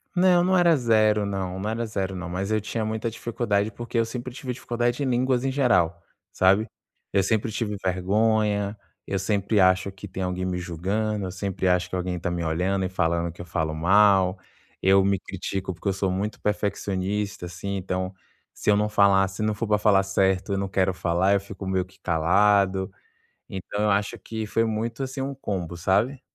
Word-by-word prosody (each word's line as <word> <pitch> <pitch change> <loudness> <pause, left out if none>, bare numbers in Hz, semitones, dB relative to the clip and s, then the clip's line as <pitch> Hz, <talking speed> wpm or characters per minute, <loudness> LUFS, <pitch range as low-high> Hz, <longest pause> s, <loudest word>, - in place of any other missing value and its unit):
Não, 180 -1 +5
não 185 +1 +3
era 170 -2 +5
0 110 -5 +3
não, 95 -2 -3
não 105 +3 -2
era 115 +1 -2
0 95 -3 -3
não. 90 -1 -5
Mas 95 +4 -3
eu 110 - +2
tinha 110 +2 -3
muita 110 +1 -2
dificuldade, 110 -2 -1
porque 120 +2 -5
eu 115 - +3
sempre 120 +2 -6
tive 125 -1 -5
dificuldade 120 +2 -1
em - - 0
línguas 125 +1 +1
em 135 - 0
geral, 90 - +2 0.3
sabe? 100 +4 +3 0.5
Eu 95 -1 +3
sempre 110 +2 0
tive 105 -1 -2
vergonha, 105 +2 +1 0.3
eu 100 - -2
sempre 100 +2 +1
acho 95 +1 +3
que 95 +1 -10
tem 95 0 -5
alguém 90 0 -2
me 90 -1 -2
julgando, 95 +5 -2
eu 90 - -4
sempre 95 0 -2
acho 90 0 +2
que 95 - -4
alguém 90 -1 -2
tá 90 - -2
me 85 -1 -2
olhando 90 +4 0
e - - -2
falando 85 -2 0
que 85 - -11
eu - - -8
falo 80 -3 -2
mal, 95 +2 +4 0.4
eu 95 0 +5
me 100 -1 +1
critico 95 0 -4
porque 90 - -7
eu 95 - +2
sou 95 -1 -1
muito 100 +3 -3
perfeccionista, 100 -1 -2
assim, 95 +3 -4
então, 95 0 -3 0.4
se - - -2
eu 105 - +6
não 105 +1 +1
falar 100 -2 +4
se 95 - -7
não 110 0 +1
for 110 +1 -3
pra 105 - +3
falar 105 -2 +4
certo 95 0 +1
eu - - 0
não 100 0 -1
quero 95 0 +1
falar, 90 +2 +1
eu 100 - +3
fico 100 0 -9
meio 95 -1 0
que 95 +1 -23
calado. 95 +3 +2 0.6
Então, 95 +2 -4
eu 105 - +3
acho 100 0 0
que 110 -1 -5
foi 115 +2 +1
muito, 115 +3 -2
assim, 130 +1 -4
um 135 +1 -3
combo, 95 -9 -4
sabe? 105 - +1
100 Hz, 205 wpm, -25 LUFS, 95-110 Hz, 0.6 s, eu